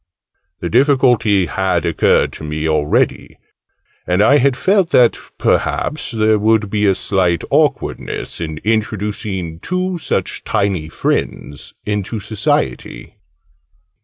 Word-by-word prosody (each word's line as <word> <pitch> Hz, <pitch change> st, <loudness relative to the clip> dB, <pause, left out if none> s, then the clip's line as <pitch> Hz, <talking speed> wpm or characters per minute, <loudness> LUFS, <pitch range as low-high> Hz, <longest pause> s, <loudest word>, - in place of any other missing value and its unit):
The -, -, -3 dB
difficulty 125 Hz, -7 st, +3 dB
had 90 Hz, 0 st, -1 dB
occurred 85 Hz, -, +2 dB
to -, -, -10 dB
me 75 Hz, +1 st, -3 dB
already: 75 Hz, -2 st, 0 dB, 0.7 s
and 90 Hz, +3 st, +2 dB
I 140 Hz, +6 st, +5 dB
had 135 Hz, 0 st, +2 dB
felt 190 Hz, -3 st, +2 dB
that 120 Hz, -2 st, +4 dB, 0.2 s
perhaps 150 Hz, -, -1 dB
there 110 Hz, -2 st, +2 dB
would 105 Hz, -1 st, +2 dB
be 105 Hz, -1 st, +1 dB
a 95 Hz, -, +3 dB
slight 90 Hz, -4 st, 0 dB
awkwardness -, -, -1 dB
in 80 Hz, -2 st, -4 dB
introducing 105 Hz, -5 st, -2 dB
two 180 Hz, -, -2 dB
such -, -, -2 dB
tiny 95 Hz, -6 st, -1 dB
friends 70 Hz, -2 st, -3 dB
into 105 Hz, +1 st, -2 dB
Society. 100 Hz, -, -2 dB
105 Hz, 115 wpm, -17 LUFS, 85-115 Hz, 0.7 s, I